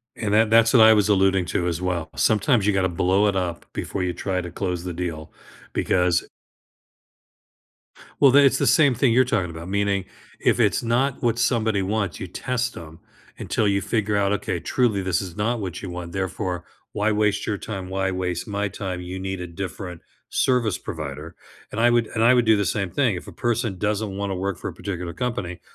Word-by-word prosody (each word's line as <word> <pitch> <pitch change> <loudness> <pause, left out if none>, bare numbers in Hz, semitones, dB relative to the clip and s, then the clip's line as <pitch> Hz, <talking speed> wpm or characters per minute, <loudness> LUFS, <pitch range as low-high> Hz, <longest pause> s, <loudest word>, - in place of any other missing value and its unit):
And 105 -2 -3
that 110 +1 +4
that's 115 +1 +5
what 120 -4 +8
I 110 0 +8
was 105 -1 +2
alluding 95 -2 +3
to 90 0 -1
as 85 0 -2
well. 90 -3 -2
Sometimes 110 0 +2
you 105 - +3
gotta 95 -1 +1
blow 95 +4 +2
it 100 - 0
up 90 -3 -2
before 95 - -3
you 90 -1 -1
try 95 +1 -2
to 90 -1 -7
close 90 -1 -3
the 90 -1 -4
deal 80 -3 -5 0.4
because 90 -1 +1 1.9
Well, 140 -2 +7
then 140 +2 +7
it's 135 0 +4
the - - +1
same 145 -5 +5
thing 120 0 +3
you're 130 +2 +5
talking 105 -8 0
about, 85 +2 -8
meaning 100 -1 0 0.3
if - - +2
it's - - +2
not 125 +4 0
what 120 -1 +1
somebody 115 -3 +1
wants, 100 -1 -2
you 95 - -5
test 120 +6 -3
'em 80 -1 -10 0.4
until 110 - 0
you 100 0 +1
figure 105 +1 -1
out, 100 -1 +2
"Okay, 105 - -2
truly 115 -6 +1
this 95 -1 0
is 90 -3 -7
not 115 +3 -1
what 95 -4 -5
you 95 - -6
want, 90 -1 -6
therefore 95 -1 -3 0.3
why 105 +1 0
waste 105 -1 +1
your 105 - -1
time, 95 -3 -6
why 95 0 -1
waste 90 -1 -3
my 105 0 -1
time? 95 -2 -5
You 90 +1 -6
need 95 -1 -4
a 90 - -5
different 90 0 -6 0.3
service 120 -6 +1
provider," 75 +1 -7 0.4
and 105 - -4
I 120 - +5
would 120 -1 +2
and 110 - -1
I 120 +2 +6
would 120 -2 +3
do 110 -1 +5
the 100 -1 0
same 95 -1 -1
thing. 125 -8 +1
If 90 - -8
a - - -8
person 120 -4 -1
doesn't 105 -1 -1
wanna 100 -1 -2
work 95 0 -2
for - - -5
a - - -5
particular 90 -3 -5
company, 90 -4 -3
100 Hz, 210 wpm, -23 LUFS, 90-110 Hz, 1.9 s, what